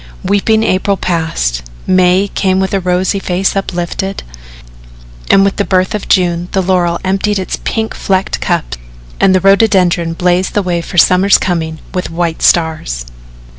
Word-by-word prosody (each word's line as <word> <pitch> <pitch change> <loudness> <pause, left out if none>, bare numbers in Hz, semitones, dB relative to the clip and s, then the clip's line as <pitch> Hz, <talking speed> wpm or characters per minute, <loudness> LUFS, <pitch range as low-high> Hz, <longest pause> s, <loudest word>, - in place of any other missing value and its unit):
Weeping 220 +3 +1
April 195 0 0
passed, 160 - -2 0.2
May 185 +1 +3
came 190 -1 0
with 190 0 -1
rosy 185 +1 0
face 190 +1 -1
uplifted, 190 0 -3 1.1
and 195 - +5
with 200 - -1
the 200 - +1
birth 185 +1 0
of 210 - -4
June 175 -1 +1
the 190 - +2
laurel 175 -2 +1
emptied 195 +2 0
its 185 - -4
pink 220 -1 -2
flecked 190 -1 -1
cups - - -2 0.4
and 190 -1 +4
the 185 - +2
rhododendron 190 -4 +3
blazed 180 +2 0
the 205 - +1
way 175 -2 -1
for 175 - -8
the - - +8
summer's 190 +2 +4
coming 160 -3 -2 0.2
with 180 -1 -3
white 165 -1 -2
stars. 155 - +1
185 Hz, 155 wpm, -13 LUFS, 175-195 Hz, 1.1 s, the